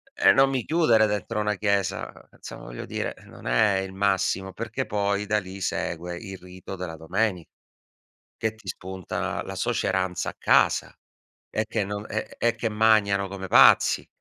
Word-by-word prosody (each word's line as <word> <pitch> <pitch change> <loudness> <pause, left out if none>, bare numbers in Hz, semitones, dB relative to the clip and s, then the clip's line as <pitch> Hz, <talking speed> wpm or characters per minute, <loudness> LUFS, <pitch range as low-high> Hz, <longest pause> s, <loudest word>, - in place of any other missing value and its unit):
E - - +6
non 135 0 +5
mi 130 -3 -1
chiudere 120 -10 +4
dentro 105 +1 -2
una 105 0 0
chiesa. 100 -2 -1 0.2
Insomma, - - -11
voglio - - -7
dire, - - -4
non - - -11
è 105 -3 +3
il 95 0 -5
massimo, 95 -1 0
perché 115 +4 -4
poi 100 0 -1
da 105 +1 +1
lì 95 0 -9
segue 85 -1 -3
il 95 0 -8
rito 90 +1 -10
della 90 -3 -6
domeni 90 +2 -1 0.9
che 110 -1 -1
ti 110 -3 -18
spunta 95 0 -4
la - - -7
suoceranza 95 -1 -1
a - - -10
casa, - - +3 0.5
e 110 - -1
che 110 -2 -1
non 105 +1 -5
e 110 - -4
e 120 0 +1
che 115 - -2
magnano 105 -2 +3
come 95 -1 -6
pazzi, - - +6
100 Hz, 165 wpm, -25 LUFS, 95-110 Hz, 0.9 s, E